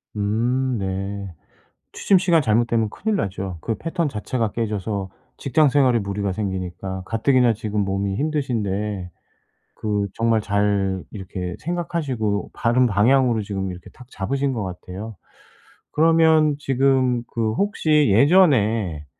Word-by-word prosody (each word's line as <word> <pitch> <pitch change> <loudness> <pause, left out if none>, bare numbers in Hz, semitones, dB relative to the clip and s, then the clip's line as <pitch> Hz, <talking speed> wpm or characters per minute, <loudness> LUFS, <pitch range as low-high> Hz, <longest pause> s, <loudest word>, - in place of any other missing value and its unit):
음. 120 +5 0
네. 95 0 -4 0.6
취침 195 - +3
시간 175 -3 +3
잘못되면 115 -2 +1
큰일 215 - -2
나죠. 95 - -3
그 115 - -2
패턴 165 - -2
자체가 115 -2 -2
깨져서 105 -3 -3 0.3
직장 145 +3 +2
생활에 130 -3 +3
무리가 100 -1 -2
생기니까 95 -1 -4
가뜩이나 120 +2 +2
지금 105 -1 -3
몸이 95 0 -2
힘드신데 105 - -2 0.6
그 105 -2 -1
정말 115 -1 +1
잘 100 -2 0
이렇게 90 -3 -6
생각하시고 145 -11 -2
바른 120 +2 +2
방향으로 120 +2 +3
지금 95 -2 -4
이렇게 90 0 -10
탁 125 - -15
잡으신 135 +7 -2
것 110 -4 -3
같아요. 95 +3 -7 0.7
그러면 160 -1 +4
지금 130 -3 +1
그 110 -2 -1
혹시 155 - +2
예전에 110 - +3
110 Hz, 280 characters per minute, -22 LUFS, 100-135 Hz, 0.7 s, 그러면